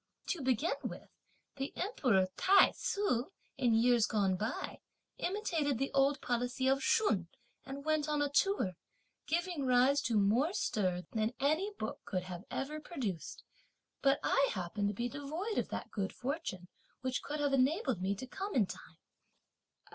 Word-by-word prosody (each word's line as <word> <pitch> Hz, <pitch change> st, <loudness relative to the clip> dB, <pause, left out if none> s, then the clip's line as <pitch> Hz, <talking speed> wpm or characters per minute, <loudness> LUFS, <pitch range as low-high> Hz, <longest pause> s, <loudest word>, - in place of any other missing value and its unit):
To 345 Hz, -, -1 dB
begin 270 Hz, +3 st, +1 dB
with, -, -, -6 dB, 0.5 s
the 270 Hz, 0 st, -3 dB
Emperor 255 Hz, -, +2 dB
Tai 390 Hz, +1 st, +6 dB
Tsu, 335 Hz, -, 0 dB, 0.3 s
in 240 Hz, -3 st, +2 dB
years 235 Hz, 0 st, +4 dB
gone 195 Hz, -3 st, +2 dB
by, 220 Hz, +6 st, -3 dB, 0.4 s
imitated 335 Hz, -, 0 dB
the 270 Hz, +3 st, -1 dB
old 275 Hz, +1 st, +3 dB
policy 245 Hz, +2 st, -1 dB
of 270 Hz, +1 st, +3 dB
Shun, 215 Hz, -, +2 dB, 0.4 s
and 280 Hz, +2 st, -6 dB
went 310 Hz, -1 st, +1 dB
on 300 Hz, -1 st, +1 dB
a 290 Hz, -, +2 dB
tour, 285 Hz, -, +1 dB, 0.5 s
giving 345 Hz, -2 st, -1 dB
rise 255 Hz, +3 st, +4 dB
to 235 Hz, -4 st, +1 dB
more 230 Hz, -, +3 dB
stir 185 Hz, -, 0 dB
than 220 Hz, +2 st, -1 dB
any 315 Hz, +9 st, +1 dB
book 220 Hz, -, -4 dB
could 185 Hz, -2 st, -2 dB
have 180 Hz, +2 st, -7 dB
ever 300 Hz, +3 st, -3 dB
produced; 240 Hz, -, -5 dB, 0.6 s
but 275 Hz, 0 st, +4 dB
I 275 Hz, 0 st, +3 dB
happen 195 Hz, +2 st, -2 dB
to 205 Hz, -, -1 dB
be 240 Hz, +4 st, -1 dB
devoid 305 Hz, -, -3 dB
of -, -, -2 dB
that -, -, -5 dB
good 195 Hz, -3 st, -2 dB
fortune 260 Hz, -, -4 dB, 0.3 s
which 255 Hz, -1 st, -1 dB
could 300 Hz, +1 st, -4 dB
have 285 Hz, -1 st, +1 dB
enabled 265 Hz, -, +2 dB
me 195 Hz, +2 st, 0 dB
to 230 Hz, -, -6 dB
come 390 Hz, +10 st, -5 dB
in 225 Hz, -6 st, +5 dB
time." -, -, -10 dB
265 Hz, 160 wpm, -34 LUFS, 215-300 Hz, 0.6 s, Tai